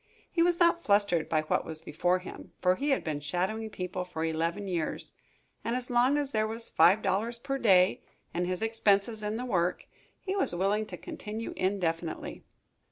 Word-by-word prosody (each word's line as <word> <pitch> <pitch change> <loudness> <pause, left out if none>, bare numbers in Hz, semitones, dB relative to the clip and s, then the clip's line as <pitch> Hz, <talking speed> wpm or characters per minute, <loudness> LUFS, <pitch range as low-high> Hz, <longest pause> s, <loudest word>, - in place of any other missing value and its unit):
He 335 - +1
was 345 0 +3
not 340 -1 +4
flustered 200 -5 +2
by 155 -1 +2
what 155 - 0
was 160 0 -4
before 175 +4 +1
him, 185 - -10
for 180 0 +4
he 280 +10 -2
had 270 - +2
been 155 -3 -2
shadowing 190 +9 -2
people 180 -2 -4
for 165 -3 -4
eleven 165 +5 -1
years, 170 -4 -3 0.5
and 235 - -1
as 250 0 -3
long 250 +4 +4
as 285 -2 -1
there 215 0 +1
was 230 +1 -4
five 200 +5 +5
dollars 210 +5 0
per 275 +3 -3
day 185 -5 +4 0.3
and 175 +1 -1
his 185 +3 -2
expenses 220 -1 +2
in 210 +1 -2
the 250 - -4
work, 180 -7 0 0.3
he 385 0 -3
was 385 - +1
willing 205 +4 +1
to - - -7
continue 220 +2 -6
indefinitely. 175 -4 -2
200 Hz, 185 wpm, -29 LUFS, 175-230 Hz, 0.5 s, five